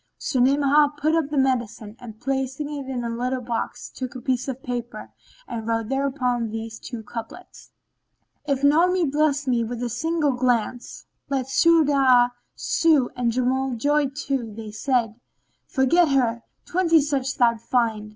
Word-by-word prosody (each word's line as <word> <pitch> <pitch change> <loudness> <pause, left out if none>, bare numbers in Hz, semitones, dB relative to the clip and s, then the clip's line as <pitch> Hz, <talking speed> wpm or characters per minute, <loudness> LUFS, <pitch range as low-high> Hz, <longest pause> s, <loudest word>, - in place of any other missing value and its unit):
So 260 - -2
Ni'amah 285 +3 +4
put 305 +2 +1
up 325 -3 +1
the 300 - -3
medicine 240 -5 -1
and, 220 -4 -11
placing 270 +3 -3
it 275 -2 -6
in 250 -2 -3
a 235 - -3
little 250 +2 -2
box, 235 -2 -4
took 255 -1 -6
a - - -5
piece 255 +1 -1
of 265 0 -5
paper 240 -1 -5 0.4
and 225 -1 -5
wrote 225 -1 -1
thereon 260 -4 -1
these 225 0 -6
two 235 -3 -7
couplets,[FN#15] 245 - -11
"If 275 0 0
Naomi 340 +5 +4
bless 295 0 +1
me 245 -3 +1
with 240 +1 -5
a 240 - -2
single 300 +5 0
glance, 245 -1 -1
* - - -48
Let 270 -2 -1
Su'adб 275 -5 +4 0.2
sue 310 -6 +2
and 245 -1 0
Juml 255 +1 0
joy 290 +4 +2 0.2
to 260 -5 -2
They 215 0 -8
said, 230 -1 -1 0.5
"Forget 305 +6 +3
her: 240 -4 +1 0.2
twenty 335 -2 +3
such 275 -2 -1
thou'lt 235 -3 +3
find." 225 -4 0
260 Hz, 160 wpm, -23 LUFS, 235-285 Hz, 0.5 s, Ni'amah